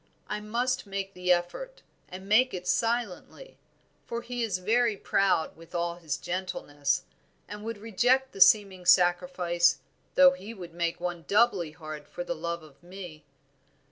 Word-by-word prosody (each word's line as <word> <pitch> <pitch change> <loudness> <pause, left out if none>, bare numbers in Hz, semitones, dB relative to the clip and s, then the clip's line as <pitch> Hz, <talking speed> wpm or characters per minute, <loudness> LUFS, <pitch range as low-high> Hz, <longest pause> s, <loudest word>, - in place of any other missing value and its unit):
I 210 - -3
must 240 +3 -1
make 195 0 -4
the 180 -1 0
effort, 180 - -1 0.3
and 190 +1 -9
make 245 +4 +4
it 180 0 -7
silently; 235 - -2 0.5
for 235 0 -4
he 245 0 -4
is 215 -5 0
very 220 +3 +1
proud 195 -4 +1
with 165 +2 -14
all 170 0 -1
his 160 -5 -3
gentleness, 175 -6 -2 0.4
and 210 0 -8
would 225 0 -4
reject 245 +5 +1
the 195 - -8
seeming 190 -4 +5
sacrifice 175 -1 +3 0.4
though 275 -1 +8
he 230 -4 -8
would 175 -4 -10
make 170 -1 -2
one 175 -1 -4
doubly 200 -7 +2
hard 155 -2 -9
for 175 - -6
love 170 -1 -4
of 150 -1 -17
me. 175 -4 -10
185 Hz, 150 wpm, -28 LUFS, 175-225 Hz, 0.5 s, though